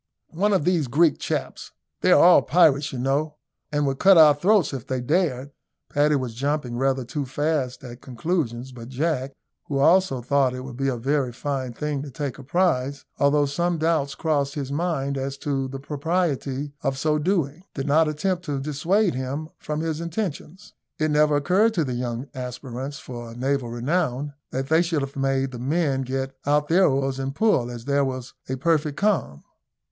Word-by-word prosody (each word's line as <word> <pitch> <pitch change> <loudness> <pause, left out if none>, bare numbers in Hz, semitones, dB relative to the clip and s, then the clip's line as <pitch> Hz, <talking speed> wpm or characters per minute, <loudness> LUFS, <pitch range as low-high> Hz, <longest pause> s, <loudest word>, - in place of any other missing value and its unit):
"One 200 +6 +1
of 185 -7 +2
these 175 -6 +2
Greek 150 +4 +3
chaps. - - -4 0.3
They - - +3
are - - +7
all - - +8
pirates, 150 -4 +3
you 130 - -5
know, 140 +4 0 0.4
and 145 -1 +1
would 135 -1 -1
cut 195 -1 +7
our 155 -2 +8
throats 180 +1 +2
if 130 -4 -6
they 130 -1 -1
dared." 145 -1 0 0.4
Paddy 150 +1 +3
was 130 -4 -2
jumping 140 0 -2
rather 130 0 0
too 145 +4 -3
fast 140 -1 -2
at 120 0 -10
conclusions; 130 -2 -2
but 120 -1 -10
Jack, 135 -1 -1 0.3
who 140 - -2
also 170 0 +4
thought 130 +1 +1
it 130 - -5
would 130 -2 -8
be 135 +2 -1
a 130 -2 0
very 135 +1 0
fine 130 0 -3
thing 150 +2 -3
to 145 - -7
take 140 -1 -5
a - - -9
prize, 140 -3 0
although 145 +1 +4
some 170 +5 -1
doubts 155 -3 0
crossed 145 -3 0
his 140 -2 -4
mind 140 -3 -1
as 135 +1 -4
to 135 -2 -2
the 135 +1 -6
propriety 145 -1 -2
of 135 0 -1
so 150 +2 +1
doing, 165 -2 0
did 135 - -3
not 155 +3 +4
attempt 175 +4 -1
to 145 -4 -2
dissuade 165 +8 +1
him 135 +5 -4
from 150 0 -3
his 160 -1 -2
intentions. 180 +2 -5 0.2
It 155 0 0
never 150 0 +4
occurred 190 +10 +2
to 165 - +2
the 130 -3 -3
young 120 +1 -3
aspirants 130 +1 -6
for 120 -3 -8
naval 130 0 -1
renown 140 +2 -1 0.2
that 135 +1 -3
they 160 +1 +5
should 165 -4 0
have 135 0 -6
made 135 -1 0
the 125 - -7
men 140 +1 0
get 135 +1 -3
out 150 +1 +1
their 185 +3 +5
oars 135 -1 0
and 135 +1 -3
pull, 175 - +2
as 120 -1 -8
there 140 0 +2
was 130 -1 -4 0.2
a 130 - -1
perfect 150 +1 0
calm. 190 - 0
140 Hz, 190 wpm, -24 LUFS, 130-160 Hz, 0.4 s, all